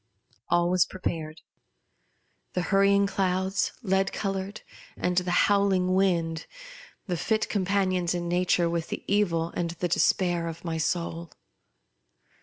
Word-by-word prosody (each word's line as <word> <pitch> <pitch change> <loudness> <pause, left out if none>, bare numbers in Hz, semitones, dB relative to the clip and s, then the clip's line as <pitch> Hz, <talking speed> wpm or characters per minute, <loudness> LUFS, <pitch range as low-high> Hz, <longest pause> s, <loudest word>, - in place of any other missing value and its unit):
All 175 0 +2
was 185 -1 +5
prepared; 160 -4 -5 1.1
the 180 - -1
hurrying 200 0 +4
clouds, 190 -1 0
lead 195 -1 +1
coloured, 195 +1 -3 0.4
and 180 0 -1
the 180 0 +1 0.2
howling 195 -3 +2
wind, 170 -4 +1 0.6
the 180 - -2
fit 215 +6 0
com 200 -3 0
panions 185 -3 +1
in 175 0 -3
nature 175 0 +2
with 170 -1 -2
the - - -5
evil 170 -5 +1
and 170 -1 -2
the 175 +1 -3
despair 175 0 +1
of 165 +1 -7
my 165 -1 -2
soul. 170 +1 -2
180 Hz, 130 wpm, -27 LUFS, 170-195 Hz, 1.1 s, was